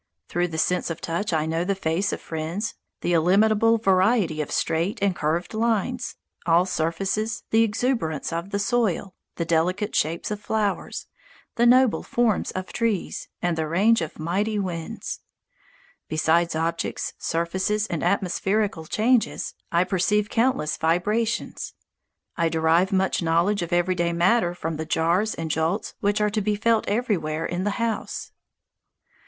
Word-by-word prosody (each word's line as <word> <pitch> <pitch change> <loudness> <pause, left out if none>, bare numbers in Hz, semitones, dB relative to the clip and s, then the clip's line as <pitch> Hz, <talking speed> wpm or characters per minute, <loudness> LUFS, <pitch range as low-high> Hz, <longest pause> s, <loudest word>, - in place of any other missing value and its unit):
Through 175 +1 0
the 160 -2 -6
sense 180 +3 +1
of 165 - -4
touch 175 +6 -2
I 155 -2 +1
know 165 +1 0
the 200 +2 0
faces 185 +1 0
of - - -5
friends, 165 +7 -3 0.3
the 175 - 0
illimitable 215 +7 +4
variety 190 -4 +2
of 150 - -4
straight 165 +5 0
and 195 -2 +1
curved 160 +5 -1
lines, 230 +2 0 0.3
all 170 +2 +5
surfaces, 195 +6 -1
the 225 - +5
exuberance 210 - 0
of 170 +3 -3
the 200 - -1
soil, 200 -4 0 0.2
the 170 - -2
delicate 180 +6 0
shapes 165 +6 0
of 210 - -3
flowers, 210 -2 -2 0.5
the 235 0 +4
noble 255 -1 +5
forms 235 -4 +1
of 185 0 -5
trees, 230 -5 -1 0.2
and 175 -1 +1
the 160 -1 -1
range 200 +7 +3
of 160 - -5
mighty 195 +7 -1
winds. 175 -5 -4 0.9
Besides 160 +2 +2
objects, 165 +1 -2
surfaces, 190 +5 0
and 170 -7 -3
atmospherical 195 0 0
changes, 230 +5 +1 0.2
I 170 +1 +4
perceive 205 +3 +1
countless 230 -10 +1
vibrations. 210 +8 -1 0.6
I 165 -1 +1
derive 165 +4 +2
much 190 -1 +1
knowledge 170 +5 +2
of 170 0 -4
everyday 175 -1 +1
matter 175 +1 +2
from 165 -2 -4
the 160 - -3
jars 170 +7 +1
and 160 -1 -3
jolts 160 +7 -1
which 205 +1 +1
are 210 0 +2
to 215 0 0
be 210 +1 0
felt 225 +1 +2
everywhere 185 -9 0
in 175 +2 -2
the - - +2
house. 230 -2 -3
185 Hz, 150 wpm, -24 LUFS, 165-215 Hz, 0.9 s, all